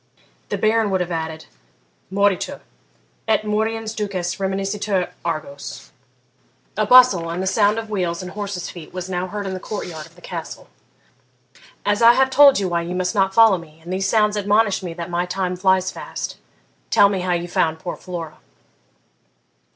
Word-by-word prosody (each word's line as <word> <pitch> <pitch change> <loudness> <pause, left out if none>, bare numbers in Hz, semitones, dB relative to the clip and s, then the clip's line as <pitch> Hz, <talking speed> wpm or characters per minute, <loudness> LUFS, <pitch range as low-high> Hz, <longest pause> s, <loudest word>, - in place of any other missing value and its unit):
The - - -1
Baron 220 0 +2
would 190 -1 +1
have 180 0 -3
added, 160 -1 -4 0.7
Moritur, 200 -1 0 0.7
et 220 -1 +2
moriens 220 +1 -1
dukes 190 -4 -3
reminiscitur 195 0 -1
Argos.' 140 -4 -5 0.8
A 215 0 0
bustle, 230 -9 +6
and 170 +2 -3
the - - -2
sound 205 +2 +2
of 225 -1 -5
wheels 180 -3 -2
and 180 - -7
horses' 200 -3 -4
feet, 175 0 -11
was 185 0 -5
now 180 0 -2
heard 205 +1 -5
in 190 - -3
the 185 - -4
court 210 +2 -5
yard 160 -3 -8
of 165 - -23
the 175 - -18
Castle. 170 -3 -7 1.2
'As 205 +2 +1
I 235 +1 +8
have 265 +1 +2
told 280 0 +7
you 195 - 0
why 170 -1 0
you 175 +2 -4
must 180 0 -1
not 195 -1 +1
follow 225 -5 +6
me, 160 -1 -15
and 175 +2 -5
these 195 +1 0
sounds 210 -1 +3
admonish 205 0 +2
me 175 -3 -6
that 170 +1 -6
my 175 +1 -1
time 180 0 -2
flies 185 0 +2
fast, - - -6 0.5
tell 200 - +6
me 200 -1 -1
how 180 0 0
you 175 0 -2
found 160 -2 +1
poor 175 +2 -5
Flora.' 170 -4 -7
190 Hz, 180 wpm, -21 LUFS, 175-210 Hz, 1.2 s, I